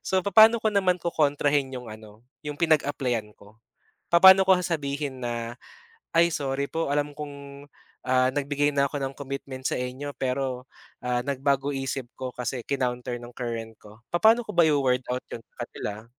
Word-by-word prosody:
So 190 -1 +1
papaano 220 +4 +6
ko 220 - +2
naman 190 -3 +2
kokontrahin 145 -4 +1
'yong 125 -3 -7
ano, 110 0 -13 0.2
'yong 150 - -3
pinag-apply-an 135 -9 0
ko? 100 +2 -19 0.5
Papaano 190 +2 +8
ko 190 -1 +4
sasabihin 145 -6 -3
na, 120 -1 -3 0.6
"Ay 170 +1 +5
sorry 140 -3 -2
po, 160 -3 -1
alam 145 0 0
kong 140 -1 -9 0.4
ah, 130 0 +3
nag-bigay 145 +1 0
na 140 -1 +2
ako 140 0 -4
ng 135 0 -3
commitment 135 -1 -7
sa - - +1
inyo 130 +3 -4
pero, 130 -1 -3 0.3
ah, 125 0 0
nag-bago 140 0 0
isip 135 -1 -3
ko 130 -1 -5
kasi 125 0 -4
kinounter 125 -2 -2
ng 120 0 -11
current 115 -2 -5
ko" 105 +1 -15
Papaano 225 +6 +4
ko 210 - -7
ba 175 - +5
iwo-word 130 -4 +2
out 125 +1 -3
yun 115 - -6
sa 120 - -8
kanila? 105 -1 -7
140 Hz, 165 wpm, -26 LUFS, 125-150 Hz, 0.6 s, Papaano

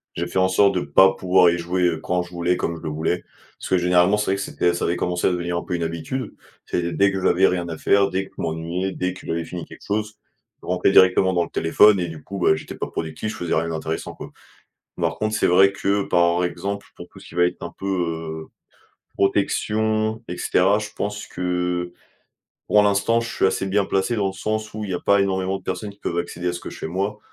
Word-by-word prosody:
J'ai 85 +1 -2
fait 90 - -4
en 95 0 +3
sorte 100 +1 +4
de 90 - +1
pas 95 +7 +5
pouvoir 90 -1 +4
y 85 - +1
jouer, 90 +1 -1
heu, 85 -2 +2
quand 90 0 0
je 90 - -14
voulais, 85 +1 0
et - - -2
comme 85 - -2
je 80 - -10
le 80 - -4
voulais, 80 +3 -1 0.4
parce - - -7
que, 95 - +3
généralement, 90 +3 +3
c'est 105 - 0
vrai - - +2
que 100 - -4
c'était 90 -3 0
ça 85 - -3
avait 85 - 0
commencé 90 0 0
à - - +4
devenir 85 0 -2
un - - -3
peu 90 - -3
une 85 - -2
habitude. 85 +10 -4 0.3
C'est 85 -1 -2
dès 100 +3 +3
que 95 -1 -3
j'avais 95 +2 +4
rien 85 -1 -1
à 80 - -5
faire, 100 0 +3
dès 95 +1 -2
que - - -18
je - - -5
m'ennuyais, 85 +4 -2
dès 90 -1 -2
que 90 - -13
j'avais 85 0 -2
fini 90 0 -6
quelque - - -14
chose, 105 +1 -2 0.5
je - - -14
rentrais 90 +1 +2
directement 95 0 +5
dans 85 -1 +2
le - - -13
téléphone 100 +5 +4
et, 85 - -2
du 80 -2 -9
coup, 100 - -7
bah, 85 - +4
j'étais - - -8
pas - - -4
productif, 80 +7 -4
je 110 - -8
faisais 85 -2 -2
rien 80 +1 0
d'intéressant, 80 0 -4
quoi. - - -9 0.7
Par 85 -1 -1
contre, 110 0 -1
c'est - - +2
vrai 95 +2 +5
que, 100 0 0
par 85 -1 +2
exemple, 100 +3 -3
pour - - -10
tout - - -18
ce - - -14
qui - - -14
va 90 - +4
être 90 - -3
un 85 - -6
peu, 95 - -6
heu, 80 -4 -3 0.7
protection 110 +2 0
et 90 - -5
cetera, 100 +4 +2
je 105 - -5
pense 105 +1 -3
que, 90 -1 -2 0.7
pour 105 - +5
l'instant, 105 +3 +2
je 115 - -4
suis - - 0
assez 95 0 0
bien 100 +1 +1
placé, 95 +3 0
dans 100 -2 +1
le - - -4
sens 110 +3 -3
où 110 0 -5
il 100 - -5
y - - -1
a 90 - -3
pas 100 0 +3
énormément 95 0 0
de - - -19
personnes 105 - -4
qui 100 - -17
peuvent 85 - -3
accéder 90 +1 -3
à - - 0
ce 85 - -6
que - - -8
je - - -10
fais, - - -4
moi. 100 +5 -2
90 Hz, 260 wpm, -22 LUFS, 85-100 Hz, 0.7 s, pas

